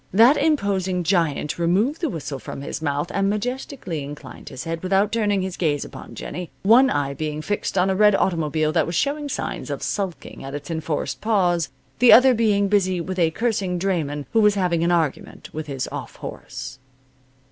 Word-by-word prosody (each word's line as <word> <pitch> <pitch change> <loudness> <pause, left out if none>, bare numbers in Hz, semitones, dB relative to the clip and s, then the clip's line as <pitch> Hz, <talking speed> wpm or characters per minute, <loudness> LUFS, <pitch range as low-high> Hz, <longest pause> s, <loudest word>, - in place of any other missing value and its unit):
That 230 +9 +6
imposing 200 - +1
giant 165 -3 0
removed 200 - +1
the 330 - 0
whistle 145 - -5
from 140 - -7
his 140 - -5
mouth, 145 +2 -1
and 195 0 +1
majestically 225 - -3
inclined 140 -2 -9
his 130 - -7
head 165 0 -4
without 195 +2 +2
turning 205 -4 +1
his 185 -1 -4
gaze 150 -5 0
upon - - -10
Jennie, 180 -2 -6
one 240 +6 +6
eye 140 -1 -1
being 155 +1 -4
fixed 205 +5 -2
on 180 - +4
a 190 - +1
red 210 0 +5
automobile 155 -4 +1
that - - +1
was 170 - -3
showing 290 - 0
signs - - -4
of - - -4
sulking 190 -9 -4
at 135 +1 -6
its 145 +3 -6
enforced 160 -1 -3
pause, 180 -6 +1 0.3
the 245 -1 +7
other 255 +1 +8
being 210 -3 +2
busy 185 -3 +2
with 185 +2 -4
a 165 -2 +4
cursing 195 -2 -1
drayman 160 -6 -1
who 225 - +4
was 210 -1 +4
having 175 -4 +1
an 170 - +2
argument 165 -5 -2
with 155 0 -5
his 135 -2 -3
off - - -6
horse. 130 0 -8
180 Hz, 190 wpm, -23 LUFS, 155-210 Hz, 0.3 s, other